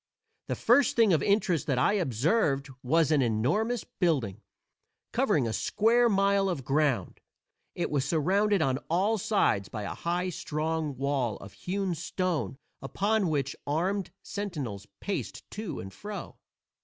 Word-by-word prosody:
The - - -1
first 245 +2 +4
thing 225 -5 +5
of 155 - +3
interest 180 -5 +1
that 135 -4 +1
I 130 - +3
observed 140 - +1
was 160 +4 +2
an 150 -3 +4
enormous 130 - +1
building, 130 - -1 0.7
covering 120 - +2
a 110 - -2
square 235 - +3
mile 200 -1 +3
of 145 -9 -3
ground. 135 - 0 0.5
It - - -2
was 140 -3 +1
surrounded 185 +6 +2
on 130 -2 +1
all 200 +6 +2
sides 145 - +1
by 105 -2 -5
a - - -4
high, 175 +2 -1
strong 155 -3 -2
wall 135 -5 0
of 100 - -11
hewn 190 0 -2
stone 180 -4 -2 0.2
upon 200 +7 0
which 140 -3 -1
armed 185 +7 0
sentinels 145 - -5
paced 200 - -4
to 210 -4 -5
and 95 0 -8
fro. 205 - -7
165 Hz, 145 wpm, -29 LUFS, 135-200 Hz, 0.7 s, thing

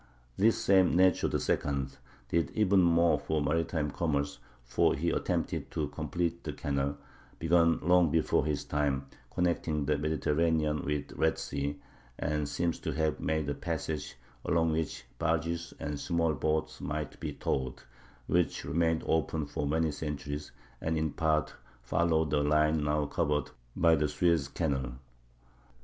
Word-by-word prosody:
This 115 +3 +4
same 95 -5 +4
Necho 95 0 +4
II 70 -2 0 0.4
did 85 -4 +1
even 100 -3 +4
more 85 -1 +4
for 80 - -1
maritime 75 0 0
commerce, 70 -3 -1 0.2
for - - +2
he 85 +5 0
attempted - - -1
to 75 -2 -2
complete 80 +3 -2
the - - -4
canal, 70 0 -1 0.4
begun 85 0 +3
long 90 0 +5
before 80 -2 +2
his 75 -1 -1
time, 70 -2 0 0.3
connecting 85 -4 0
the 75 0 +1
Mediterranean 75 0 +1
with 75 0 -2
the - - -11
Red 80 0 +2
Sea, 70 +1 -3 0.4
and 75 -1 -1
seems 85 +3 -1
to - - -3
have 80 0 0
made 80 -2 -1
a 70 - 0
passage 75 0 -4 0.3
along 85 -2 +2
which 80 -6 -2
barges 85 +1 -1
and 75 0 -4
small 85 0 +1
boats 75 +3 -1
might 75 -1 -4
be - - -4
towed, 65 -1 -2 0.4
which 90 +4 +1
remained 80 -1 +1
open 80 -1 0
for 70 0 -3
many 80 +1 +1
centuries, 75 0 -5 0.3
and 80 0 0
in 80 -1 0
part 80 0 +1 0.3
followed 80 +2 +1
the 75 -1 +3
line 75 +1 +3
now 75 0 +1
covered 75 +1 0 0.2
by 85 -1 +5
the 75 -1 +2
Suez 80 -1 +2
Canal. 70 -5 -2
80 Hz, 145 wpm, -30 LUFS, 75-85 Hz, 0.4 s, long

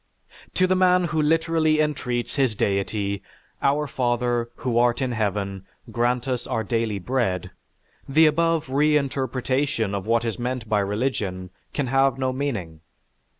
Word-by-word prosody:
"_) - - -40
To 185 - +4
the 185 - +2
man 180 -1 +4
who 160 -2 0
literally 160 0 +2
entreats 130 -5 -1
his 130 -6 +1
deity, 100 0 -1 0.4
"Our 145 +2 +2
Father, 120 -3 0
who 120 -2 0
art 120 0 +3
in 130 -2 -1
Heaven, 100 -3 -2 0.2
grant 120 +2 0
us 125 -2 -2
our 110 - -1
daily 115 -1 -1
bread," 100 -3 -1 0.6
the 155 +4 +5
above 165 +1 +2
reinterpretation 135 -4 0
of 100 0 -3
what 115 +1 +2
is 115 +1 -3
meant 125 -1 -3
by 105 -1 +2
religion 100 -3 -2 0.2
can 145 - -1
have 135 0 +2
no 130 -1 -1
meaning. 110 - -3
125 Hz, 150 wpm, -24 LUFS, 110-145 Hz, 0.6 s, the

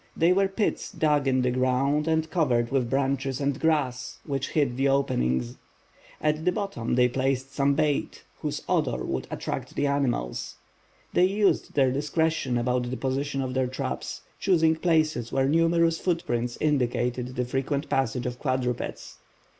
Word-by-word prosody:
They 170 +3 +4
were 195 +1 +3
pits 195 +2 -2
dug 150 -3 +1
in 130 -1 +2
the 125 - +2
ground 130 +4 +1
and 160 0 +1
covered 125 -9 +1
with 130 -3 +1
branches 135 0 0
and 140 -1 -1
grass, 145 -6 0
which 140 -2 -2
hid 140 -6 +1
the 135 +2 +1
openings. 65 - 0 0.6
At 155 +1 0
the 180 - +3
bottom 180 - -2
they 125 0 +5
placed 135 +1 -1
some 140 0 +2
bait, 150 -1 0 0.2
whose - - -3
odor 60 0 0
would 65 -1 -3
attract - - -5
the 145 - +1
animals. 130 - -1 0.6
They 180 - +5
used 200 +2 +1
their 135 -3 +4
discretion 145 -1 0
about 125 0 0
the 130 - -3
position 135 +1 -1
of 130 -1 -4
their 130 -1 +1
traps, 125 - -4 0.2
choosing 165 -4 +3
places 155 -8 +1
where 135 0 +2
numerous 165 +2 +3
footprints 120 -9 -1
indicated 125 -3 0
the 125 - 0
frequent 135 +3 -2
passage 125 -2 0
of 125 0 -4
quadrupeds. 130 -3 -3
135 Hz, 155 wpm, -26 LUFS, 125-155 Hz, 0.6 s, they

